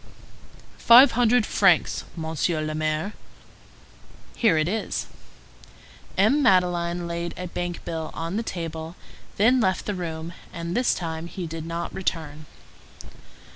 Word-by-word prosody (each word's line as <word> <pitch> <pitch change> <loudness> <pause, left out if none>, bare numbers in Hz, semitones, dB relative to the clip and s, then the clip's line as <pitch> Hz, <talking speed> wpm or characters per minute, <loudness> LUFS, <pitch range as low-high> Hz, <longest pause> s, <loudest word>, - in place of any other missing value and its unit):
"Five 245 +4 +8
hundred 240 -1 +3
francs, 185 -5 +2
Monsieur 160 0 -1
le 155 0 -3
Maire." 155 +6 -2 1.2
"Here 220 -9 +3
it 155 +1 +1
is." 215 +4 -2 1.1
M. 220 +10 +4
Madeleine 175 -5 +2
laid 170 0 -4
a 180 - -5
bank 175 0 -5
bill 160 -2 -4
on 165 +3 -4
the 225 - 0
table, 165 -5 -5 0.4
then 245 +6 +4
left 190 -5 0
the 205 - -2
room; 165 -2 -5 0.2
and 170 +1 -5
this 250 0 +2
time 165 -1 -5
he 180 0 -6
did 165 0 -6
not 170 +1 -4
return. 155 -5 -4
170 Hz, 130 wpm, -24 LUFS, 160-195 Hz, 1.2 s, Five